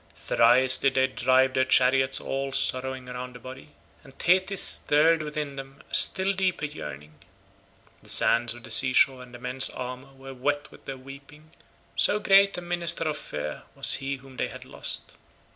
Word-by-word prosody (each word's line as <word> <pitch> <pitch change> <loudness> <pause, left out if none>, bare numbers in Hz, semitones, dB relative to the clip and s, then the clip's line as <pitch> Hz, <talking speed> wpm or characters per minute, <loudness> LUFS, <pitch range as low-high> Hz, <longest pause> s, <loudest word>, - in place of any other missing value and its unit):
Thrice 130 +3 +4
did 135 -1 0
they 130 0 +3
drive 130 +1 +1
their 130 - +1
chariots 130 +1 +2
all 135 0 -4
sorrowing 130 0 -1
round 125 0 -8
the - - -11
body, 130 +4 -12 0.3
and 135 -1 -18
Thetis 185 +2 +1
stirred 160 +2 +3
within 150 -2 -6
them 135 +1 -11
a - - -20
still 190 +1 +3
deeper 185 -5 -2
yearning. 75 - -10 0.8
The - - -12
sands 120 0 +3
of 120 - -14
the - - -12
sea 130 -1 +4
shore 130 0 +3
and 125 -1 -13
the 120 - -11
men's 125 +2 +1
armour 125 +1 -9
were 135 0 -12
wet 145 +3 -3
with - - -18
their 135 - -7
weeping, 140 +4 -15 0.4
so 205 - +2
great 200 -2 +3
a - - -5
minister 175 -1 0
of 155 -2 -2
fear 75 0 -6
was - - +3
he 135 0 -4
whom 135 -1 -16
they - - -2
had - - -12
lost. - - -6
135 Hz, 180 wpm, -25 LUFS, 125-150 Hz, 0.8 s, Thrice